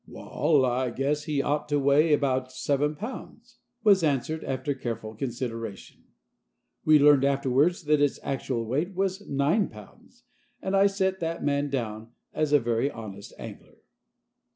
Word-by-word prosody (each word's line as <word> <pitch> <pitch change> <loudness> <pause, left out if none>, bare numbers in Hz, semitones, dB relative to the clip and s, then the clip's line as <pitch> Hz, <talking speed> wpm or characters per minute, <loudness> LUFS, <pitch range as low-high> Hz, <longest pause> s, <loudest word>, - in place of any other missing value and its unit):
"Wal, 145 -5 +1
I 125 +1 0
guess 140 +4 -1
he 145 -4 0
ought 145 +1 -1
to 145 - +2
weigh 145 +3 +3
abaout 130 -3 0
seven 145 +3 0
pounds," 235 - -9 0.2
was 200 -3 +5
answered, 155 +2 0
after 135 +2 -2
careful 115 -4 -5
consideration. 115 -3 -6 0.8
We 155 -1 +6
learned 145 -2 +6
afterwards 140 +5 +2
that 150 -1 +2
its 145 -1 +1
actual 130 -3 -2
weight 150 - -2
was 195 +1 -2
nine 145 +9 +2
pounds, 105 -2 -16 0.4
and 190 +1 -2
I 195 +1 +5
set 190 -1 -1
that 165 0 -3
man 145 0 0
down 115 -3 -4 0.2
as 155 -2 0
a 145 - +6
very 120 +2 0
honest 105 -5 -9
angler. - - -11
140 Hz, 150 wpm, -27 LUFS, 130-155 Hz, 0.8 s, We